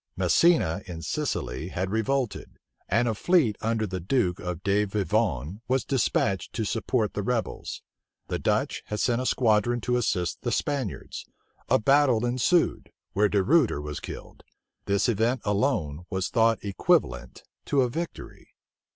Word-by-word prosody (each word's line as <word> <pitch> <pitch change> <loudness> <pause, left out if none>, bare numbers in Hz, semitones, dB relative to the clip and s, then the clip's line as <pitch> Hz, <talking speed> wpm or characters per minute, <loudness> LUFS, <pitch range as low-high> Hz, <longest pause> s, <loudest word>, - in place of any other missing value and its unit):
Messina 160 - +3
in 85 -2 -7
Sicily 65 +7 -3
had 95 +1 -3
revolted; 120 +3 -2 0.3
and 115 +5 +2
a 115 - +1
fleet 140 - +2
under 110 -1 0
the 95 -2 -4
duke 90 -1 0 0.2
de 100 +1 +2
Vivonne 100 - -1
was 130 +1 +1
despatched 110 -7 0
to 110 - -2
support 110 0 -1
the 105 - -2
rebels. 115 +2 -3 0.4
The - - -2
Dutch - - 0
had 105 - -3
sent 120 +1 +1
a 130 - -1
squadron 120 0 +2
to 125 +2 0
assist 90 -7 -1
the - - -2
Spaniards. 140 -9 -3 0.4
A - - +5
battle 130 -1 +3
ensued, 130 +8 +1 0.2
where 105 +1 +3
De 100 -1 +2
Ruyter 140 - +3
was 75 0 -5
killed. - - -9 0.4
This 100 +3 +1
event 120 +3 +1
alone 90 - 0
was 95 -1 -2
thought 115 -1 +3
equivalent 65 -10 0 0.2
to 140 - +2
a 125 - +1
victory. 170 +5 -7
110 Hz, 145 wpm, -26 LUFS, 95-125 Hz, 0.4 s, A